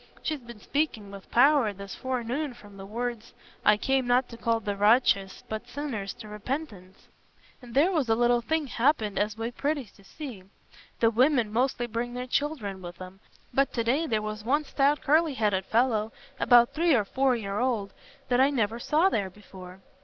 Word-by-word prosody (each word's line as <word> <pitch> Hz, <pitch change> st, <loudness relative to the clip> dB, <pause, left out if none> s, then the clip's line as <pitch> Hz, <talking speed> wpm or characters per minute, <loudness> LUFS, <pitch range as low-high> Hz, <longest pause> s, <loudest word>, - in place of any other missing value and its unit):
She's 310 Hz, -2 st, -2 dB
been 235 Hz, -3 st, -12 dB
speaking 225 Hz, -6 st, -2 dB
with 200 Hz, -1 st, -11 dB
power 270 Hz, -2 st, +4 dB
this 200 Hz, 0 st, -9 dB
forenoon 260 Hz, +2 st, -3 dB
from 205 Hz, -3 st, -15 dB
the 195 Hz, 0 st, -9 dB
words, 235 Hz, +1 st, -4 dB, 0.3 s
'I 210 Hz, -, +5 dB
came 265 Hz, +2 st, 0 dB
not 245 Hz, +1 st, +3 dB
to 235 Hz, -, -9 dB
call 230 Hz, 0 st, 0 dB
the 205 Hz, -2 st, -3 dB
righteous, 205 Hz, -2 st, +3 dB
but 220 Hz, +2 st, -5 dB
sinners 245 Hz, -7 st, -4 dB
to 235 Hz, -3 st, -11 dB
repentance.' 210 Hz, -, -6 dB, 0.5 s
And 245 Hz, -1 st, -12 dB
there 315 Hz, +7 st, +4 dB
was 300 Hz, -9 st, 0 dB
a 225 Hz, -, +4 dB
little 240 Hz, +1 st, +3 dB
thing 315 Hz, +5 st, -1 dB
happened 230 Hz, -5 st, +1 dB
as 210 Hz, +1 st, -1 dB
was 225 Hz, +1 st, -3 dB
pretty 285 Hz, 0 st, -1 dB
to 200 Hz, -, -19 dB
see. 250 Hz, -1 st, -8 dB, 0.6 s
The 230 Hz, -1 st, +5 dB
women 240 Hz, -2 st, +2 dB
mostly 245 Hz, 0 st, +1 dB
bring 240 Hz, +1 st, -4 dB
their 250 Hz, 0 st, -4 dB
children 250 Hz, -8 st, -2 dB
with 175 Hz, -1 st, -9 dB
'em, 185 Hz, +1 st, -10 dB, 0.3 s
but 275 Hz, +2 st, +2 dB
to 230 Hz, -, 0 dB
day 275 Hz, +8 st, +1 dB
there 220 Hz, -5 st, 0 dB
was 215 Hz, 0 st, -5 dB
one 285 Hz, +7 st, +1 dB
stout 285 Hz, +1 st, +1 dB
curly 310 Hz, 0 st, +3 dB
headed 205 Hz, -5 st, 0 dB
fellow 225 Hz, -1 st, +1 dB, 0.3 s
about 240 Hz, +1 st, +5 dB
three 325 Hz, 0 st, +3 dB
or 215 Hz, -4 st, +2 dB
four 265 Hz, +4 st, +1 dB
year 200 Hz, -3 st, -3 dB
old, 230 Hz, -6 st, -1 dB, 0.4 s
that 245 Hz, 0 st, +3 dB
I 270 Hz, -, +5 dB
never 230 Hz, -4 st, -1 dB
saw 310 Hz, +8 st, +3 dB
there 205 Hz, -, 0 dB
before. 185 Hz, -1 st, -13 dB
235 Hz, 190 wpm, -27 LUFS, 210-270 Hz, 0.6 s, I